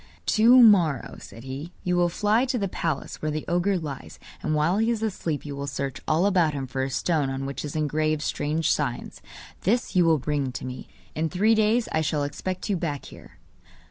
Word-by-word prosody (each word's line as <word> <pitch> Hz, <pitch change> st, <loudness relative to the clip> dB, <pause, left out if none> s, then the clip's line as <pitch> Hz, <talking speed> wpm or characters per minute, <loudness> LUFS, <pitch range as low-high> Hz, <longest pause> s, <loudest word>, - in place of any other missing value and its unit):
'To 240 Hz, +3 st, +6 dB
morrow,' 175 Hz, -, +4 dB
said 115 Hz, -, -12 dB
he, 135 Hz, +6 st, -6 dB
'you 180 Hz, 0 st, 0 dB
will 175 Hz, 0 st, +3 dB
fly 210 Hz, +6 st, +2 dB
to 255 Hz, -1 st, -1 dB
the 200 Hz, -3 st, -1 dB
palace 165 Hz, -5 st, -3 dB
where 155 Hz, -, -1 dB
the 155 Hz, 0 st, -3 dB
ogre 175 Hz, +3 st, +1 dB
lies, 135 Hz, -, -7 dB, 0.2 s
and 155 Hz, -, -1 dB
while 160 Hz, +6 st, +2 dB
he 225 Hz, +1 st, +2 dB
is 225 Hz, -2 st, -1 dB
asleep 170 Hz, -9 st, -3 dB
you 145 Hz, -1 st, -5 dB
will 140 Hz, 0 st, -5 dB
search 140 Hz, -1 st, -4 dB
all 160 Hz, +4 st, +2 dB
about 180 Hz, -6 st, +3 dB
him 135 Hz, -1 st, -3 dB
for 130 Hz, +1 st, -4 dB
a 135 Hz, -, -1 dB
stone 145 Hz, +1 st, 0 dB
on 135 Hz, 0 st, -3 dB
which 140 Hz, 0 st, -5 dB
is 150 Hz, 0 st, -6 dB
engraved 155 Hz, 0 st, 0 dB
strange 150 Hz, 0 st, 0 dB
signs; 125 Hz, -5 st, -2 dB, 0.4 s
this 230 Hz, +3 st, 0 dB
you 180 Hz, -, +5 dB
will 165 Hz, -1 st, +4 dB
bring 145 Hz, -1 st, -2 dB
to 125 Hz, -, -6 dB
me. 130 Hz, 0 st, -7 dB, 0.3 s
In 160 Hz, +1 st, -1 dB
three 205 Hz, +7 st, +3 dB
days 220 Hz, +2 st, +2 dB
I 160 Hz, -, +1 dB
shall 150 Hz, -1 st, 0 dB
expect 180 Hz, +6 st, -4 dB
you 205 Hz, -, +1 dB
back 150 Hz, -5 st, -3 dB
here. -, -, -15 dB
155 Hz, 210 wpm, -25 LUFS, 140-190 Hz, 0.4 s, To